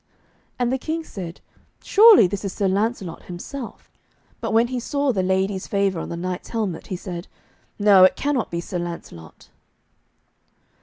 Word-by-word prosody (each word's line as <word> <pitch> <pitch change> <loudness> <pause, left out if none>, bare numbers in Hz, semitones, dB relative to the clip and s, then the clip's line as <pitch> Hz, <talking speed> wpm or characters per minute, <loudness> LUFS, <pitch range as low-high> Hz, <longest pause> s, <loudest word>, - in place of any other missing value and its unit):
And 245 0 0
the 265 - -1
King 320 +4 -3
said, 180 - -8 0.4
'Surely 425 - +7
this 195 +3 -3
is 195 - -3
Sir 200 - 0
Lancelot 195 -2 -2
himself.' 225 +9 -8 0.5
But - - -3
when 230 +2 +3
he 255 -1 -2
saw 280 +3 0
the 195 -6 0
lady's 190 +1 0
favour 200 -3 0
on - - -5
the 170 - -5
knight's 180 +1 -4
helmet, 210 -8 -3
he 185 - -4
said, 175 -1 -7 0.5
'No, 205 -3 +6
it 185 - +6
cannot 280 -5 -1
be 170 0 -3
Sir 180 +1 -4
Lancelot.' 170 - -8
195 Hz, 160 wpm, -22 LUFS, 180-240 Hz, 0.5 s, Surely